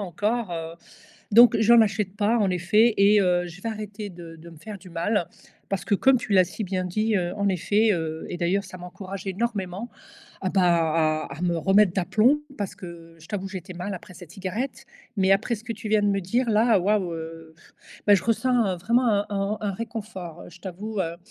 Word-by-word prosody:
encore, 205 +2 -2
heu, 165 0 -5 0.6
donc 235 +2 +8
j'en 230 +1 +7
achète 200 -1 -1
pas 215 +3 +2
en 200 -3 +2
effet 210 +6 +3
et 205 +1 +5
heu, 185 - +2 0.2
je 175 +3 -11
vais 230 - -4
arrêter 210 -1 -6
de 170 -2 -11
de 165 +1 -13
me 165 - -13
faire 205 +4 -9
du 185 - -14
mal 175 +2 -1 0.4
parce 195 -2 -2
que 205 - +1
comme 265 +5 +4
tu 230 - -4
l'as 185 -2 +6
si 215 - -6
bien 185 -1 -2
dit, 215 +5 0
heu, 175 -3 0
en 200 -1 -1
effet, 205 +4 +2
heu 160 -2 -3
et 175 - -5
d'ailleurs 185 +3 0
ça 185 - -10
m'encourage 190 +2 -8
énormément 200 0 -3 0.5
à, 190 - -1
bah 190 -2 +2
à 160 -4 +1
à 165 - -8
me 170 -2 +1
remettre 195 +1 +4
d'aplomb 220 +10 +2 0.2
parce 200 -3 -4
que 165 -2 -11
je 165 - -14
t'avoue 195 -2 -4
j'étais 185 -2 -8
mal 180 +3 -5
après 185 0 -9
cette 175 -2 -12
cigarette, 215 +9 -5 0.3
mais 190 0 +4
après 210 +5 +1
ce 215 - -14
que 235 - -3
tu 215 0 -7
viens 215 -1 +4
de - - +2
me 195 0 +1
dire 235 +7 0
là, 220 0 +4
waouh, 195 -2 +1
heu, 165 0 -8 0.5
bah 205 - +7
je 190 - +1
ressens, 235 0 +2
heu, - - -7
vraiment 235 +7 +2
un 205 -2 +2
un 200 +1 -2
un 205 -2 -2
réconfort, 200 -6 -7
heu, - - -13
je - - -16
t'avoue, 200 +3 -6
heu, 170 -1 -2
195 Hz, 215 wpm, -25 LUFS, 175-215 Hz, 0.6 s, donc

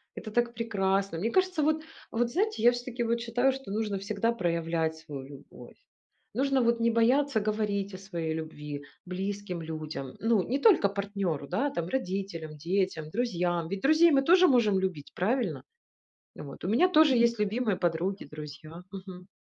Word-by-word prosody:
это 215 - -7
так 240 +1 +1
прекрасно. 195 -5 0
Мне 220 +6 0
кажется, 370 -3 +2
вот 310 +1 +1 0.3
вот 235 +1 0
знаете, 415 - 0
я 240 - +8
всё-таки 245 0 -4
вот 235 0 0
считаю, 245 +3 +2
что 265 -7 -8
нужно 210 -1 -1
всегда 210 +3 0
проявлять 165 -4 -1
свою 150 -4 -8
любовь, 140 0 -13 0.6
нужно 270 +3 +2
вот 235 0 +2
не 235 - +4
бояться 250 +3 +3
говорить 205 -2 -1
о - - -6
своей 170 -5 -4
любви 150 -2 -6 0.2
близким 190 0 -4
людям, 155 -4 -6
ну, 225 -2 +3
не 265 +8 -1
только 360 - +5
партнеру, 200 -7 -3
да, 230 - 0
там, 170 -6 -3
родителям, 185 -9 -3
детям, 170 -1 -1
друзьям. 175 -7 -1
Ведь 195 +1 -4
друзей 315 +4 +5
мы 270 -2 +4
тоже 360 +5 +6
можем 220 - +4
любить, 185 -7 -3
правильно? 185 - 0 0.7
Вот. 145 +2 -9
У - - -1
меня 245 - +4
тоже 310 -6 +5
есть 235 -1 +3
любимые 210 0 0
подруги, 175 +3 -1
друзья 155 +3 -9
Мгм. 185 -2 -9
200 Hz, 165 wpm, -29 LUFS, 170-240 Hz, 0.7 s, я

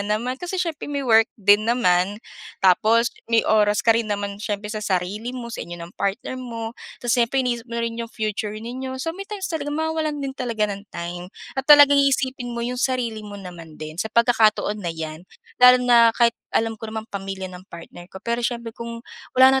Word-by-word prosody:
naman 235 +5 -2
kasi 355 +1 -4
siyempre 335 -6 -3
may-work 245 -6 +3
din 205 +1 +4
naman 190 -4 +2 0.5
tapos 220 +6 +4 0.2
may 230 -1 +3
oras 210 -1 +3
ka 230 - +6
rin 225 -1 -1
naman 200 -1 -3
siyempre 210 0 -3
sa 215 - -4
sarili 205 +4 -2
mo, 235 -1 -7
sa - - -5
inyo 175 +1 -7
ng 170 0 -9
partner 205 +6 -3
mo, 230 -2 -5 0.3
tapos 240 0 +2
siyempre 255 +3 +1
iniisip 240 -1 -2
mo 235 - -5
rin 230 0 -4
'yong 230 - -5
future 215 -2 -3
ninyo." 255 +4 -5
So 325 +5 -3
may 395 +2 -8
times 410 -2 -5
sa 320 - -2
mawawalan 310 +1 -2
din 270 - -3
talaga 235 -5 -1
ng 200 +1 -10
time 175 +1 -6 0.2
at 265 +2 -4
talagang 285 -1 +8
iisipin 260 -2 0
mo 235 - -2
yung 250 +1 -3
sarili 245 -4 -1
mo 205 -1 -9
naman 175 -5 -10
din 155 +2 -6
sa 220 - -2
pagkakataon 220 -2 +3
na 175 - -3
yan, 160 -1 -5 0.4
lalo 250 0 +9
na 235 -2 +5
kahit 235 -1 +4 0.2
alam 225 -1 -1
ko 225 - -6
namang 220 0 -5
pamilya 195 -1 -5
ng 180 +1 -12
partner 170 +1 -11
ko - - -12
pero 235 0 -1
siyempre, 235 -1 -3
kung 235 +1 -8 0.3
wala 265 +1 +7
230 Hz, 200 wpm, -23 LUFS, 205-250 Hz, 0.5 s, lalo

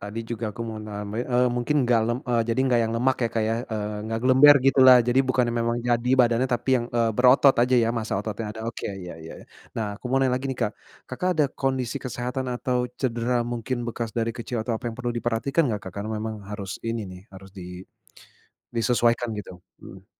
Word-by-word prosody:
Tadi 105 +3 -6
juga 120 -1 -3
aku 120 - -5
mau 110 -1 -6
name 105 +2 -5
eee, 125 0 +2
mungkin 120 +5 0
nggak 120 -2 +3
lem 120 +1 -1
eee, 120 -1 +2
jadi 115 +2 +1
nggak 125 -2 +3
yang 115 - -3
lemak 130 +2 +2
ya, 115 - +1
Kak, 115 - +1
ya? 115 - +1 0.2
Eee, 105 -1 -3
nggak 115 0 -2
gelember 130 +3 +7
gitulah, 130 -2 +8
jadi 120 +2 +3
bukan 130 -1 +2
yang 120 - -2
memang 115 0 0
jadi 120 0 +1
badannya 120 +1 +3
tapi 120 - -6
yang, 120 - -4
eee, 115 -1 +2
berotot 130 +2 +6
aja 125 +1 +2
ya. - - 0
Masa 110 -1 -3
ototnya 110 +1 -5
ada. 110 - -8
Oke, 115 - -5 0.2
iya 90 - -7
iya. 80 - -9 0.4
Nah 115 - -1
aku - - -35
mau 130 - +1
nanya 130 -1 +2
lagi 135 - -5
nih, 130 - -3
Kak, 105 - 0 0.4
Kakak 180 +8 -2
ada 155 - +4 0.2
kondisi 130 -3 -1
kesehatan 125 +1 -3
atau 125 0 -1
cedera 120 -1 -1 0.2
mungkin 120 +2 -3
bekas 115 -1 -4
dari 115 0 0
kecil 120 +1 -5
atau 120 - -3
apa - - -12
yang 115 - -8
perlu 125 -1 -3
diperhatikan 120 +6 0
nggak, 105 -2 -3
Kakak? 100 +4 -6
Memang 110 0 -3 0.2
harus 100 -2 -6 0.2
ini 115 0 -2
nih 90 0 -10
harus 95 0 -12
di 90 -2 -9 0.9
disesuaikan 120 0 +2
gitu. 100 - -7 0.3
Mhm. 95 +1 -12
120 Hz, 215 wpm, -25 LUFS, 110-125 Hz, 0.9 s, gitulah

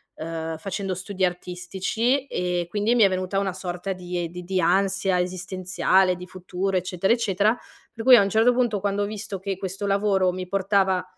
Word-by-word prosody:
ehm, 160 0 -5
facendo 195 +3 -3
studi 185 +1 -1
artistici 190 +9 -1
e 180 -5 -1
quindi 210 +4 +1
mi 240 - +3
è 195 - +6
venuta 185 +1 -1
una 195 -2 -1
sorta 185 +1 -4
di 180 -1 -4
di 180 +1 -8
di 185 +1 -1
ansia 195 +1 +2
esistenziale, 185 +1 +1
di 180 +1 -9
futuro, 185 +1 -3
eccetera, 185 +2 0
eccetera. 215 -1 +1 0.4
Per 225 - -6
cui 255 +1 +9
a 235 - +7
un 200 - +1
certo 225 +4 +4
punto, 240 -4 +1
quando 200 +1 -1
ho - - 0
visto 205 -2 -5
che 195 0 -3
questo 195 +2 -4
lavoro 195 -2 +2
mi 185 0 -6
portava 195 -1 +1
190 Hz, 185 wpm, -24 LUFS, 180-200 Hz, 0.4 s, cui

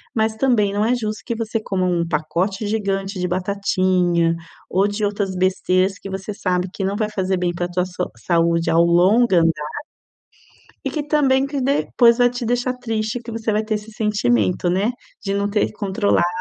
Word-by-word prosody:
mas 220 -1 +1
também 220 -5 +2
não 205 +1 +1
é 245 +2 +2
justo 215 -3 -4
que 235 - -2
você 225 0 -2
coma 190 -3 -1
um 170 -2 0
pacote 170 +6 -1
gigante 195 -2 -2
de 180 - 0
batatinha, 185 -2 +1 0.3
ou 195 +2 +2
de 205 +1 -2
outras 200 -2 -2
besteiras 185 +1 +1
que 195 - -8
você 190 +2 -5
sabe 180 -2 -1
que 200 - -4
não 195 +1 -1
vai 210 0 -1
fazer 190 -2 -1
bem 175 -1 -1
para 175 0 -2
a - - -19
tua 180 0 0
so 180 0 -4
saúde 170 -1 +1
ao 165 +1 +5
longo 185 +8 +4
andar. 165 - 0 1.0
E - - +1
que 305 - -2
também 275 -3 +3
que 280 0 -3
depois 250 -3 +3
vai 245 0 +4
te 245 0 -5
deixar 245 +2 0
triste 225 -2 -3
que 235 0 -9
você 225 -1 -2
vai 210 +1 +1
ter 215 0 -1
esse 210 +1 -6
sentimento, 175 - +1
né, 195 +5 +1 0.3
de 195 -1 -2
não 200 0 0
ter 210 +1 +1
controlado 200 -3 +1
200 Hz, 195 wpm, -21 LUFS, 180-220 Hz, 1.0 s, ao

